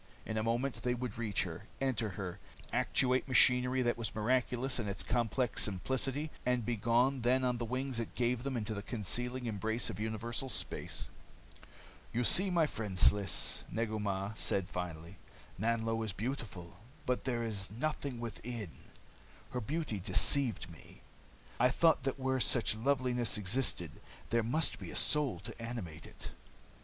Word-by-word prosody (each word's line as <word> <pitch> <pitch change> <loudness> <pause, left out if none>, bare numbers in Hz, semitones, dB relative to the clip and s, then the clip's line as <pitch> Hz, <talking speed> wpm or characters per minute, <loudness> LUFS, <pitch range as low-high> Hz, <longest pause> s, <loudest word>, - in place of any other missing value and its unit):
In 110 - -3
a 110 - +1
moment 120 +4 -1
they 125 0 0
would 120 -2 -5
reach 115 0 +1
her, 90 +3 -7
enter 125 -5 0
her, 90 -4 -5 0.3
actuate 130 +1 +2
machinery 125 0 +5
that 120 0 0
was 115 - -3
miraculous 125 +3 +1
in 110 - -2
its 100 - -3
complex 120 +1 0
simplicity, 130 +9 0
and 125 -2 +1
be 120 - 0
gone 120 +5 +2
then 130 +2 +3
on 125 -1 +1
the 120 - -2
wings 130 +1 -2
it 115 - -5
gave 120 -1 +1
them 135 -1 -2
into 110 -1 -3
the 100 - -4
concealing 125 +4 -2
embrace 110 +2 -1
of 100 - -8
universal 110 +4 -2
space. - - -2 1.0
"You 120 +2 0
see, 190 - +5
my 170 -3 +3
friend 105 -9 -4
Sliss," 100 0 +3
Negu 110 -1 -1
Mah 100 -1 -1
said 95 -3 +1
finally, 90 -1 -6 0.4
"Nanlo 115 +1 0
is 110 -4 -3
beautiful, 100 -8 -5 0.3
but 125 0 -1
there 120 -3 0
is 100 -4 -2
nothing 135 +2 -3
within. 115 -4 -5 0.8
Her 125 - -2
beauty 140 -3 -2
deceived 100 +4 +4
me. 85 -3 -14 0.6
I 125 +1 +5
thought 160 +4 +4
that 135 0 -1
where 130 0 +1
such 120 -3 +3
loveliness 125 -1 +1
existed, 100 - -1 0.4
there 115 - +3
must 130 +9 +1
be - - -7
a - - -8
soul 150 -4 +3
to - - -7
animate 105 -10 -6
it. - - -8
115 Hz, 160 wpm, -34 LUFS, 105-130 Hz, 1.0 s, machinery